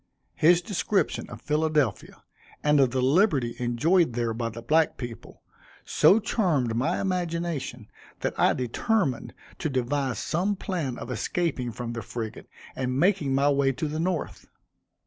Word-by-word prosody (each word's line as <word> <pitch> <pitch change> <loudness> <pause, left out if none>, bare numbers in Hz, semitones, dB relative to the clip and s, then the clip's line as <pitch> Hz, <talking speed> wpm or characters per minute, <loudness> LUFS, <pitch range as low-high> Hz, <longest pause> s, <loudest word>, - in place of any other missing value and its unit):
His 170 +2 +4
description 200 +1 -1
of - - -10
Philadelphia, 150 -4 0 0.4
and 150 -1 +4
of 135 -2 +5
the 130 +1 -1
liberty 140 - +3
enjoyed 135 +6 +2
there 115 -1 -1
by 115 0 -2
the 115 +1 -9
black 155 +6 +2
people, 120 -2 -9 0.4
so 210 - +5
charmed 155 - 0
my 125 +4 0
imagination 170 - -2 0.3
that - - -1
I - - +3
determined 135 - -1 0.2
to 155 - -1
devise 130 0 -1
some 190 +6 0
plan 165 -10 -3
of - - -7
escaping 145 -9 -1
from 120 +1 -5
the 115 - -4
frigate, 115 -2 -6 0.3
and 130 0 -1
making 170 -7 +2
my 140 +1 +3
way 140 -1 +2
to 140 +5 -3
the 155 +1 -4
North. 175 0 -3
145 Hz, 145 wpm, -26 LUFS, 125-170 Hz, 0.4 s, of